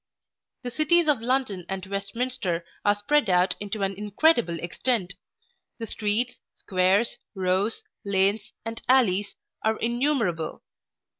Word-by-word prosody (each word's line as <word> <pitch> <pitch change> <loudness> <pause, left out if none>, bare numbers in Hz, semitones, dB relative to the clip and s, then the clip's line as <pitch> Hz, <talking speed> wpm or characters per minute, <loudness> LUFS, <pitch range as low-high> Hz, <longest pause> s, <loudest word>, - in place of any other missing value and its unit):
The 245 - -4
cities 315 +4 +3
of 285 -7 +3
London 240 -6 0
and 190 0 -4
Westminster 200 -2 -2 0.2
are 205 0 +4
spread 225 +4 +1
out 180 0 +4
into 205 0 -3
an 195 0 0
incredible 210 - +2
extent. 180 +2 -1 0.6
The 230 - -4
streets, 225 +3 -1 0.2
squares, 190 +4 +1 0.2
rows, 190 +3 0 0.2
lanes, 200 +1 +1
and 225 0 -5
alleys, 205 -6 +3 0.3
are 220 0 +1
innumerable. 235 - 0
205 Hz, 120 wpm, -26 LUFS, 190-245 Hz, 0.6 s, are